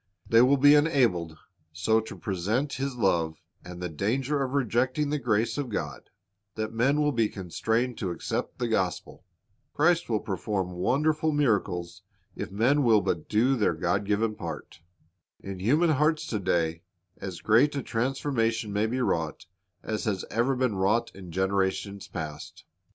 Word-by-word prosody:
They 115 0 +6
will 135 +3 +5
be 145 +2 +7
enabled 120 - +2 0.3
so 100 +8 +2
to 110 - -9
present 110 +8 -1
His 135 0 -3
love 85 -8 0 0.2
and 90 0 -9
the 90 - -3
danger 130 - -1
of 130 -1 -2
rejecting 130 +3 +1
the 150 - 0
grace 115 +1 0
of 140 -3 -3
God, 75 - -5 0.5
that 110 0 -3
men 135 +6 +2
will 150 -1 +2
be 115 -5 +1
constrained 110 +6 -2
to 95 - -2
accept 85 - -3
the 120 - -1
gospel. 95 -5 -2 0.5
Christ 170 +1 +2
will 110 -2 +1
perform 95 -2 -3
wonderful 150 - +1
miracles 100 - 0 0.3
if - - -5
men 125 +9 +2
will 115 -5 +4
but 90 -4 -2
do 120 +6 +3
their 110 -5 +1
God 100 +1 0
given 105 +2 0
part. 85 -7 -7 0.6
In 95 -1 -7
human 150 - +3
hearts 150 +2 +2
to 105 - -1
day 85 -3 0 0.4
as 95 -4 -6
great 125 +8 +3
a 140 - -2
transformation 115 -3 -1
may 105 +2 +1
be 125 +3 -2
wrought 80 -7 -1 0.4
as 110 -1 -3
has 100 -4 -1
ever 125 +4 +1
been 125 -5 0
wrought 105 +5 +1
in 95 -3 -10
generations 95 +2 -1
past. 75 -2 -7
110 Hz, 160 wpm, -27 LUFS, 95-130 Hz, 0.6 s, be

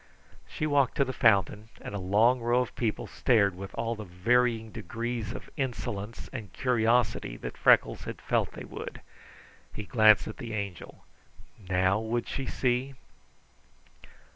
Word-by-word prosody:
She 155 - -3
walked 145 -3 +2
to 140 - +3
the 130 - -4
fountain, 105 -2 +2
and - - -8
a 100 - -3
long 110 +7 +3
row 120 +2 +2
of 125 - -4
people 115 -3 -2
stared 105 -7 +2
with 95 +1 -8
all 115 0 -1
the 110 -2 -7
varying 110 +4 +1
degrees 115 +2 -4
of - - -8
insolence 110 -4 -4
and 110 -8 -7
curiosity 120 - +1
that - - -7
Freckles - - +3
had - - -6
felt - - 0
they - - -8
would. - - -8 0.7
He 105 - -6
glanced 110 -1 +5
at 110 - -7
the 115 -4 -6
Angel. 100 -5 -6 0.6
NOW 95 +2 +2
would 115 +2 -2
she 135 - -4
see? 130 +2 -1
115 Hz, 150 wpm, -28 LUFS, 100-125 Hz, 0.7 s, glanced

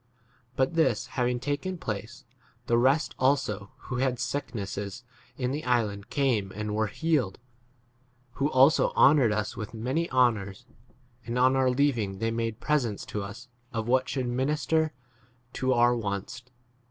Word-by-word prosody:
But 130 +4 +1
this 160 -10 +2
d - - -17
having 125 -1 0
taken 145 +8 -3
place, 115 +1 -6 0.4
the 120 - +2
rest 135 +5 +2
also 130 -7 +1
who 125 - -5
had 125 -1 0
sick 140 -1 -3
nesses 100 +2 -5 0.3
in 125 -1 -1
the 150 +3 -3
island 105 -5 0
came 120 -9 +1
and 105 0 -3
were 110 0 +1
10 - - -12
healed: 150 -12 0 0.9
who 140 +3 -1
also 135 +2 +5
honoured 135 -6 +6
us 105 0 -2
with 110 0 -6
many 130 +10 -1
honours, 110 -7 +1 0.6
and 120 +1 -3
on 130 +1 +4
our 130 -1 +3
leaving 125 -7 +1
they 115 +2 -1
made 115 -1 -2
presents 125 -9 0
to 105 - -4
us 100 +6 -8 0.2
of 115 -2 -3
what 130 +1 +2
should 130 -3 -2
minister 150 +5 +1 0.6
to 130 0 0
our 120 0 +4
wants. 105 +2 -4
125 Hz, 155 wpm, -28 LUFS, 110-135 Hz, 0.9 s, honoured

